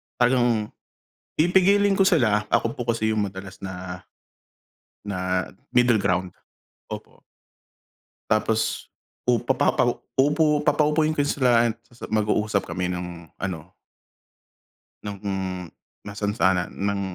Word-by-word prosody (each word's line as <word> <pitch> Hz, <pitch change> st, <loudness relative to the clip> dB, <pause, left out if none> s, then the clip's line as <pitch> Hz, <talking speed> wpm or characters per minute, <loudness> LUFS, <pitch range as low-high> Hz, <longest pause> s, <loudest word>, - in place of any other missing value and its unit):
talagang, 120 Hz, -3 st, +2 dB, 0.7 s
pipigilin 195 Hz, +4 st, +4 dB
ko 195 Hz, -, +4 dB
sila 120 Hz, -, +3 dB
ako 115 Hz, 0 st, +1 dB
po 120 Hz, -1 st, -1 dB
kasi 110 Hz, -1 st, 0 dB
'yung 105 Hz, -, +1 dB
madalas 95 Hz, 0 st, -10 dB
na, 90 Hz, -1 st, -6 dB, 1.0 s
na, 90 Hz, -1 st, -1 dB, 0.2 s
middle 120 Hz, -3 st, +4 dB
ground, 90 Hz, 0 st, 0 dB, 0.6 s
opo. -, -, -9 dB, 1.1 s
Tapos, 110 Hz, 0 st, 0 dB, 0.4 s
u 120 Hz, -1 st, +4 dB
papapa -, -, +1 dB, 0.4 s
uupo 150 Hz, +2 st, +3 dB
papa-upuin 155 Hz, +1 st, +3 dB
ko 145 Hz, -, +1 dB
sila 120 Hz, -4 st, +3 dB, 0.4 s
mag-uusap 105 Hz, -1 st, +1 dB
kami 90 Hz, -1 st, -2 dB
ng 90 Hz, -2 st, -6 dB
ano. 90 Hz, -2 st, -5 dB, 1.3 s
Nung, 100 Hz, -1 st, -6 dB, 0.9 s
masansanan 100 Hz, -3 st, 0 dB
ng 100 Hz, 0 st, -1 dB
110 Hz, 100 wpm, -24 LUFS, 95-130 Hz, 1.3 s, pipigilin